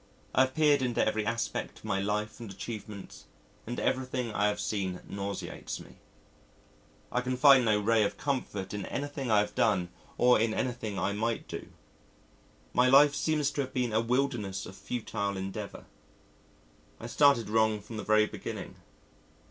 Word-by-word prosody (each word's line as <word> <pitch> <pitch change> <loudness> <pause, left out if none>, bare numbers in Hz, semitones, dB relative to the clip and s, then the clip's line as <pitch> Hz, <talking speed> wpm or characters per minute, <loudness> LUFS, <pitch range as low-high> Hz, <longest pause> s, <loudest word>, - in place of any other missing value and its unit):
I - - +5
have 130 0 -10
peered 150 -3 +4
into 125 -2 +1
every 110 0 0
aspect 115 0 -2
of - - -15
my 95 - 0
life 105 +2 -2
and 115 -3 -7
achievements 100 0 -8 0.4
and 120 - -3
everything 130 -3 -1
I 105 - +2
have 105 0 -1
seen 95 -5 -2
nauseates 100 0 -5
me. - - -14 1.1
I 125 - +1
can 125 0 -2
find 135 -1 +7
no 105 -2 +3
ray 110 +2 +3
of 100 - -1
comfort 105 -9 -3
in 105 -2 -4
anything 140 -2 -4
I 110 - +5
have 105 0 -4
done 95 -6 +2 0.3
or 125 -1 +5
in 110 0 +1
anything 120 -5 -2
I 95 +2 0
might 115 +3 -2
do. - - -6 1.1
My 125 +1 +4
life 140 +2 +7
seems 150 -2 +1
to 145 - -1
have 130 -1 -5
been 125 -3 0
a 110 - +3
wilderness 115 -6 -1
of 95 - -10
futile 100 -3 -3
endeavour. 95 +2 -6 1.1
I - - -8
started 140 -1 +4
wrong 110 0 +2
from 110 +2 -9
the - - -4
very 110 0 +4
beginning. - - -7
110 Hz, 165 wpm, -30 LUFS, 105-125 Hz, 1.1 s, find